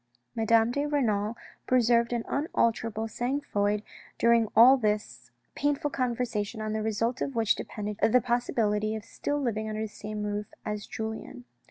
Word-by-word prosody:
Madame 225 Hz, +1 st, +3 dB
de 285 Hz, +3 st, -1 dB
Renal 225 Hz, -6 st, 0 dB, 0.3 s
preserved 235 Hz, -1 st, +3 dB
an 235 Hz, -1 st, -1 dB
unalterable 230 Hz, -6 st, 0 dB
sang 245 Hz, +5 st, -2 dB
froid 205 Hz, -6 st, 0 dB, 0.3 s
during 235 Hz, -1 st, +4 dB
all 240 Hz, +5 st, +9 dB
this 210 Hz, -, -2 dB, 0.2 s
painful 290 Hz, 0 st, 0 dB
conversation 235 Hz, -4 st, -2 dB
on 215 Hz, 0 st, -3 dB
the 220 Hz, -, -1 dB
result 225 Hz, +3 st, -1 dB
of 275 Hz, -, -2 dB
which 225 Hz, -2 st, +3 dB
depended 210 Hz, -1 st, -5 dB
the 250 Hz, +3 st, +5 dB
possibility 220 Hz, -3 st, 0 dB
of 215 Hz, -1 st, -7 dB
still 290 Hz, +5 st, -3 dB
living 220 Hz, -5 st, -2 dB
under 215 Hz, 0 st, -3 dB
the 220 Hz, -, -2 dB
same 210 Hz, 0 st, -6 dB
roof 210 Hz, 0 st, -3 dB, 0.2 s
as 210 Hz, -1 st, -4 dB
Julien. 220 Hz, -, -6 dB
225 Hz, 155 wpm, -28 LUFS, 210-245 Hz, 0.3 s, all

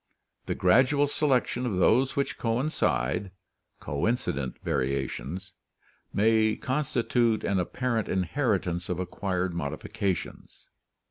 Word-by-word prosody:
The -, -, -1 dB
gradual 130 Hz, +10 st, +4 dB
selection 130 Hz, -4 st, +1 dB
of 105 Hz, -, -1 dB
those 125 Hz, +8 st, +3 dB
which 140 Hz, -, -1 dB
coincide 110 Hz, -, 0 dB, 0.5 s
(coincident 70 Hz, -, -1 dB
variations) 70 Hz, +8 st, -2 dB, 0.6 s
may 110 Hz, +1 st, +3 dB
constitute 120 Hz, -4 st, 0 dB
an 100 Hz, -1 st, +1 dB
apparent 115 Hz, +4 st, -1 dB
inheritance 95 Hz, -, 0 dB
of 90 Hz, -1 st, -2 dB
acquired 90 Hz, 0 st, -2 dB
modifications." 85 Hz, +4 st, -4 dB
100 Hz, 90 wpm, -28 LUFS, 90-125 Hz, 0.6 s, gradual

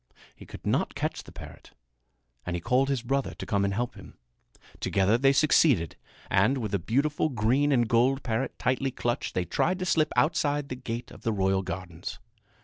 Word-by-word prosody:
He -, -, -14 dB
could -, -, -11 dB
not -, -, 0 dB
catch -, -, -2 dB
the -, -, -14 dB
parrot -, -, -12 dB, 0.7 s
and 90 Hz, -, -3 dB
he -, -, -2 dB
called 130 Hz, +9 st, +1 dB
his 135 Hz, -4 st, -1 dB
brother 135 Hz, +2 st, -1 dB
to -, -, -7 dB
come 100 Hz, -1 st, +1 dB
and 100 Hz, -, +1 dB
help 120 Hz, +4 st, -2 dB
him. -, -, -14 dB, 0.6 s
Together 100 Hz, +3 st, +2 dB
they 135 Hz, +3 st, +4 dB
succeeded; 140 Hz, -, +3 dB, 0.3 s
and, 100 Hz, +8 st, +3 dB
with 110 Hz, -5 st, -3 dB
the 100 Hz, -, 0 dB
beautiful 140 Hz, -, 0 dB
green 130 Hz, +4 st, +2 dB
and 120 Hz, -4 st, +3 dB
gold 125 Hz, +4 st, +2 dB
parrot 125 Hz, +2 st, -2 dB
tightly 130 Hz, +2 st, 0 dB
clutched, 120 Hz, -1 st, -3 dB
they 90 Hz, -, 0 dB
tried 180 Hz, -, 0 dB
to 185 Hz, -, -3 dB
slip 155 Hz, -3 st, +2 dB
outside 145 Hz, -2 st, +1 dB
the 125 Hz, -, -3 dB
gate 120 Hz, -1 st, -6 dB
of -, -, -13 dB
the 115 Hz, -, 0 dB
royal 95 Hz, -2 st, +1 dB
gardens. 90 Hz, -1 st, -6 dB
120 Hz, 190 wpm, -27 LUFS, 100-140 Hz, 0.7 s, they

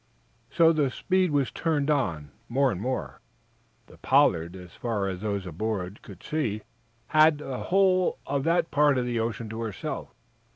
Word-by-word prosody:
So 165 Hz, -1 st, +4 dB
the 150 Hz, -4 st, +1 dB
speed 185 Hz, +6 st, +1 dB
was 145 Hz, -3 st, +1 dB
turned 155 Hz, -3 st, 0 dB
on, 85 Hz, -, -1 dB, 0.2 s
more 135 Hz, +2 st, +2 dB
and 95 Hz, -, -5 dB
more. 130 Hz, +3 st, -4 dB, 0.6 s
The -, -, -17 dB
"Pollard," 90 Hz, -, +3 dB
as 90 Hz, -2 st, -11 dB
far 110 Hz, -5 st, -2 dB
as 95 Hz, -1 st, -4 dB
those 100 Hz, -3 st, -2 dB
aboard, 95 Hz, +2 st, -4 dB
could 95 Hz, -3 st, -13 dB
see, 110 Hz, -9 st, -2 dB, 0.4 s
had 155 Hz, 0 st, +5 dB
the 135 Hz, -3 st, -5 dB
whole 185 Hz, -1 st, +2 dB
of 140 Hz, 0 st, -1 dB
that 170 Hz, 0 st, +1 dB
part 145 Hz, -1 st, +4 dB
of 125 Hz, -, 0 dB
the 120 Hz, -1 st, -1 dB
ocean 115 Hz, 0 st, -3 dB
to 110 Hz, +1 st, -5 dB
herself. 110 Hz, -5 st, -5 dB
125 Hz, 165 wpm, -27 LUFS, 100-150 Hz, 0.6 s, had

